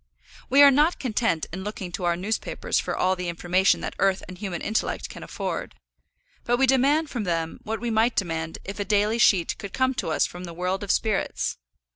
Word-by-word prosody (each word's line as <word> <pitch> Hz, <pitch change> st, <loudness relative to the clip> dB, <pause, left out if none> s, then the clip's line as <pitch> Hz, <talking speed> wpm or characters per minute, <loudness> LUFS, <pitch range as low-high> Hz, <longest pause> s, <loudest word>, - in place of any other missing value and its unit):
We 280 Hz, +2 st, +7 dB
are 280 Hz, -, +9 dB
not 300 Hz, +6 st, +3 dB
content 225 Hz, -, 0 dB
in 190 Hz, +1 st, -5 dB
looking 200 Hz, -3 st, -5 dB
to 175 Hz, +1 st, -4 dB
our 170 Hz, 0 st, +2 dB
newspapers 200 Hz, +6 st, -2 dB
for -, -, -3 dB
all 185 Hz, +1 st, +2 dB
the 180 Hz, -1 st, -4 dB
information 175 Hz, +3 st, +2 dB
that -, -, -4 dB
earth 195 Hz, -1 st, +2 dB
and 185 Hz, -, -8 dB
human 180 Hz, -3 st, -4 dB
intellect 220 Hz, -, -1 dB
can -, -, -10 dB
afford; -, -, -5 dB, 0.7 s
but 240 Hz, 0 st, +1 dB
we 270 Hz, -, +4 dB
demand 280 Hz, +4 st, +3 dB
from 240 Hz, -4 st, -2 dB
them 165 Hz, -3 st, -2 dB
what 220 Hz, +1 st, -3 dB
we 240 Hz, 0 st, -2 dB
might 225 Hz, +2 st, +2 dB
demand 165 Hz, -3 st, -2 dB
if 195 Hz, +2 st, -6 dB
a -, -, +1 dB
daily 210 Hz, +2 st, +1 dB
sheet 190 Hz, -6 st, +4 dB
could 200 Hz, -, -7 dB
come 260 Hz, 0 st, +1 dB
to 240 Hz, -, -3 dB
us 155 Hz, -, +2 dB
from 180 Hz, +1 st, -7 dB
the 170 Hz, -1 st, -9 dB
world 180 Hz, +2 st, -1 dB
of 200 Hz, -, -7 dB
spirits. 215 Hz, -, 0 dB
200 Hz, 210 wpm, -25 LUFS, 180-235 Hz, 0.7 s, are